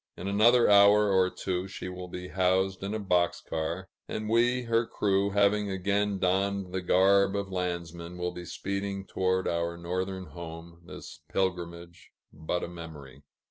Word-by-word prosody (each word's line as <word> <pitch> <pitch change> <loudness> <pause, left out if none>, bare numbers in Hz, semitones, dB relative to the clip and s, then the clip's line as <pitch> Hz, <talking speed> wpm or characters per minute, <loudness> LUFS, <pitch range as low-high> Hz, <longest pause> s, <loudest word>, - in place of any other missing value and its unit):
In 90 - -5
another 115 +5 +5
hour 100 0 +6
or 95 -1 +4
two, 90 0 -3
she 95 - -7
will 90 0 -7
be 90 +1 -7
housed 95 +1 +1
in 100 +2 -3
a - - -2
box 90 -4 +1
car; 80 +4 -4 0.2
and 110 0 -4
we, 120 +2 +3
her 115 0 +1
crew, 100 -1 +1
having 100 +1 +2
again 100 +1 0
donned 95 0 0
the 95 - -1
garb 95 +2 +4
of 100 -1 -3
landsmen, 85 -1 -4
will 90 0 -2
be 90 0 -8
speeding 100 +2 -4
toward 95 0 0
our 85 0 -1
northern 95 +2 -3
home, 85 +1 -10
this - - -10
pilgrimage 85 -2 -3 0.2
but 80 +3 -3
a - - -3
memory. 80 -6 -10
95 Hz, 160 wpm, -28 LUFS, 85-100 Hz, 0.2 s, hour